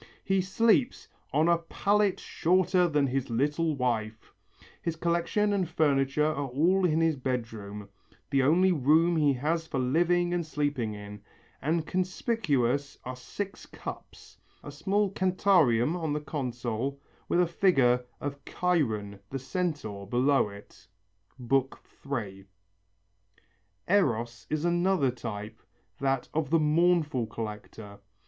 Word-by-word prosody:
He 195 -1 +2
sleeps 225 +7 +2 0.2
"on 155 +4 +3
a 170 -1 +4
pallet 200 +4 +1
shorter 180 +1 +2
than 150 -3 +2
his 135 -1 -2
little 150 +6 0
wife." 110 -4 -2 0.5
His 170 -2 -2
collection 170 +5 0
and 185 -4 0
furniture 145 -3 +2
are 150 -2 -1
all 170 +9 +2
in 160 -1 +1
his 165 -1 +2
bedroom, 115 -6 -4 0.4
the 135 -1 +3
only 175 +8 +4
room 160 +3 +3
he 150 -3 +3
has 160 +5 -1
for 140 - -3
living 175 +7 +2
and 175 -1 0
sleeping 145 -8 -2
in, 105 0 -9 0.4
and 160 +2 0
conspicuous 155 - 0
are 130 +1 -5
six 190 +10 -7
cups, - - -10 0.2
a 145 - -8
small 195 +7 0
cantarium 180 - +3
on 160 -4 -2
a - - 0
console 130 -2 -3 0.3
with 175 - +2
a 180 - +5
figure 135 -9 +3 0.2
of 140 -1 -5
Chiron 110 - -1
the 135 - -3
Centaur 135 - -3
below 130 +1 +2
it 100 -2 -14 0.5
(III). 125 -5 -3 1.4
Eros 120 - +1
is 155 +2 -1
another 175 -5 +2
type, 110 -3 -7 0.4
that 135 -2 0
of 155 -2 -1
the 165 +1 +3
mournful 155 -5 +2
collector. 105 -2 -8
145 Hz, 125 wpm, -28 LUFS, 125-175 Hz, 1.4 s, a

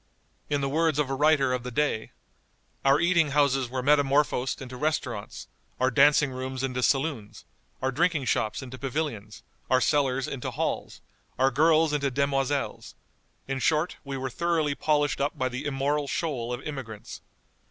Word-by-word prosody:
In 145 -1 0
the 135 - 0
words 155 +1 +1
of 145 -3 0
a - - 0
writer 140 -2 +3
of 125 - -1
the 125 - -6
day: 125 -3 -1 0.7
"Our 135 +1 +4
eating 170 -3 +3
houses 135 -3 +2
were 130 0 -3
metamorphosed 140 -2 +2
into 130 -1 -8
restaurants; 130 -7 -3 0.3
our 130 +1 +2
dancing 145 +2 +5
rooms 130 0 -4
into 125 -1 -2
saloons; 135 -6 -1 0.4
our 130 - +1
drinking 160 0 +1
shops 110 +1 -1
into 130 0 -9
pavilions; 130 -7 -4 0.3
our 130 - +4
cellars 135 -2 +1
into 135 -3 -4
halls; - - -3 0.4
our 135 +1 +3
girls 155 +2 +3
into 140 -1 +1
demoiselles; 140 +1 -1 0.5
in 135 0 -2
short, 155 +4 +1
we 140 -2 -5
were 130 0 -4
thoroughly 165 -1 0
polished 145 -1 +1
up 145 +2 -1
by 130 -2 0
the 125 +3 -5
immoral 145 +1 0
shoal 130 -6 -2
of 125 +2 -4
immigrants. 130 -8 -7
135 Hz, 160 wpm, -27 LUFS, 130-150 Hz, 0.7 s, dancing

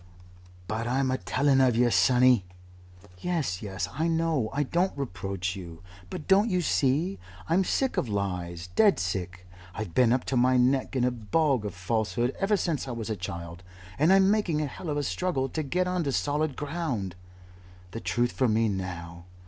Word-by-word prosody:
"But 110 +2 -2
I'm 130 +1 +1
a 130 - -1
telling 135 +9 +2
of 125 -3 +4
yer, 120 0 +3
sonny 125 -4 +5 0.4
" 90 +2 -21
"Yes, 155 - -2
yes, 95 -2 -3
I 160 +6 0
know. 165 -8 +1
I 145 +1 0
don't 175 +4 0
reproach 95 -7 -3
you. 85 -3 -9 0.3
But 150 - -7
don't 200 +4 +4
you 180 -2 +1
see? 155 +5 +1 0.3
I'm 175 +4 +3
sick 265 +7 0
of 120 - 0
lies. 90 -4 -3
Dead 205 -3 +5
sick. 90 0 -3 0.3
I've 110 -6 -5
been 125 -3 +4
up 125 +1 +2
to 135 - -2
my 125 +1 +4
neck 130 +2 +2
in 125 - +1
a 125 - +2
bog 125 +1 0
of 100 -3 -5
falsehood 110 +6 -1
ever 205 +1 +2
since 165 -7 -2
I - - -4
was 115 -1 -4
a - - -1
child 85 -2 -7 0.4
and 155 +5 +4
I'm 195 0 +5
making 200 -8 +1
a - - 0
hell 160 +5 -7
of 145 - -1
a 145 - 0
struggle 155 -5 -1
to 155 - -2
get 180 +6 0
on 180 -1 0
to 140 - 0
solid 145 +1 0
ground. 145 - -3 0.8
The 115 - -5
Truth 120 +1 0
for 130 - +1
me 110 0 +2
now. 85 -3 -5
125 Hz, 190 wpm, -27 LUFS, 100-155 Hz, 0.8 s, sonny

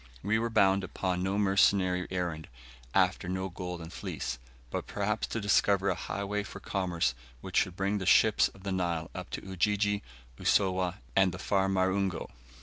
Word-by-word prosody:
We 105 +3 +2
were 115 +1 -1
bound 100 -3 +3
upon 90 -1 -2
no 95 +2 0
mercenary 95 -2 +3
errand, 85 -4 -3 0.5
after 90 - +2
no 95 +1 -2
Golden 90 -1 -6
Fleece, 65 - -4 0.3
but - - -3
perhaps 105 +2 -1
to 115 - -3
discover 100 -1 +3
a - - +2
highway 100 +1 -3
for 100 0 -8
commerce 90 -8 0 0.3
which - - -4
should 90 - +2
bring 100 +2 0
the 95 - -4
ships - - +5
of 95 - -16
the 100 - -3
Nile 85 -4 -1
up - - -7
to - - -5
Ujiji, 105 +2 +1 0.4
Usowa, 95 -3 +2 0.2
and 95 -2 +3
far 95 0 +1
Marungu. 95 -2 +1
95 Hz, 160 wpm, -30 LUFS, 90-100 Hz, 0.5 s, ships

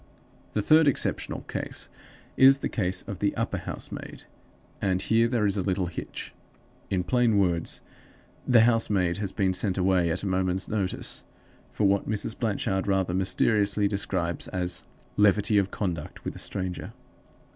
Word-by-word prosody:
The 105 - 0
third 155 +4 +5
exceptional 140 - -1
case - - -4 0.5
is 135 +1 +7
the - - 0
case 95 -4 -1
of 100 - -7
the 100 - 0
upper - - -2
housemaid; - - -7 0.6
and 95 -2 +1
here 115 +4 +3
there 115 -3 +1
is 100 0 +1
a - - +1
little 95 0 0
hitch. 85 0 -6 0.6
In 90 -2 0
plain 120 0 +2
words, 85 -4 0 0.7
the 120 -3 +6
housemaid 105 -6 +2
has 100 -2 -3
been 95 -2 +1
sent 95 0 0
away 90 -2 +2
at 90 +4 -1
a - - -2
moment's 95 -1 0
notice, 100 -4 -2 0.5
for - - -2
what 100 0 +2
Mrs. 110 +1 -2
Blanchard 100 -4 -1
rather 95 -2 +1
mysteriously 100 +2 +2
describes 95 -4 -1
as 90 -1 -2 0.3
'levity 105 0 +4
of 95 -1 0
conduct 85 -8 -4
with - - -4
a - - -8
stranger. 90 -2 -4
100 Hz, 155 wpm, -27 LUFS, 90-105 Hz, 0.7 s, is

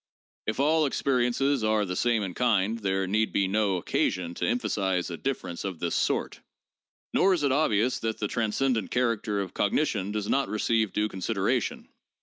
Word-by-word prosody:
If 110 - -2
all 155 +2 +3
experiences 135 0 +1
are 110 -1 +2
the 90 -1 -4
same 115 +1 +1
in 95 -2 -4
kind, 110 -1 +1
there 95 -2 0
need 110 +4 +1
be 100 - +1
no 100 0 +1
occasion 85 0 -1
to - - -2
emphasize 95 -7 0
a - - -3
difference 90 -10 -4
of 95 -3 -4
this 85 0 -2
sort, - - 0 0.7
nor 190 -1 +4
is 160 - -3
it 140 - +2
obvious 125 -4 +2
that 110 -1 -2
the 105 - -2
transcendent 115 +1 0
character 115 -4 0
of 95 -3 -6
cognition 105 -3 0
does 105 -1 -3
not 140 -5 +1
receive 110 0 +1
due 105 0 0
con 95 - -8
sideration. 90 - -1
110 Hz, 175 wpm, -27 LUFS, 95-125 Hz, 0.7 s, nor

